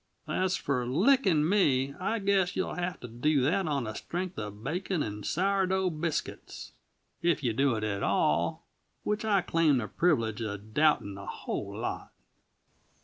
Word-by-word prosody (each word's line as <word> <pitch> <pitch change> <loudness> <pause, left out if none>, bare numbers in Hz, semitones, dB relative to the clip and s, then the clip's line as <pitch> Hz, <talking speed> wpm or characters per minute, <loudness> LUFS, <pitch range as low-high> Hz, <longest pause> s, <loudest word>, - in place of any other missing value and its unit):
"As 185 0 0
for 125 -4 -1
licking 180 - +3
me, 140 -9 +2
I 220 +5 0
guess 195 -2 +1
you'll 185 - -1
have 180 0 -3
to 125 - -6
do 135 +5 +1
that 180 +6 +1
on 140 -4 0
the 110 -1 -4
strength 180 - -4
uh 105 -1 -3
bacon 150 - -3
and 105 0 -5
sour 195 - +1
dough 190 -1 +1
biscuits; 160 0 -4 0.5
if 170 -4 +1
you 120 -3 +1
do 135 +1 +2
it 110 - -3
at 100 -2 -2
all, 85 +3 +1 0.4
which 210 +1 -1
I 205 -3 +3
claim 165 -5 +3
the 110 -3 -2
privilege 115 - +1
uh 105 -2 -3
doubting 110 -1 +1
a 100 - -9
whole - - -5
lot." - - -4
155 Hz, 165 wpm, -29 LUFS, 115-185 Hz, 0.5 s, licking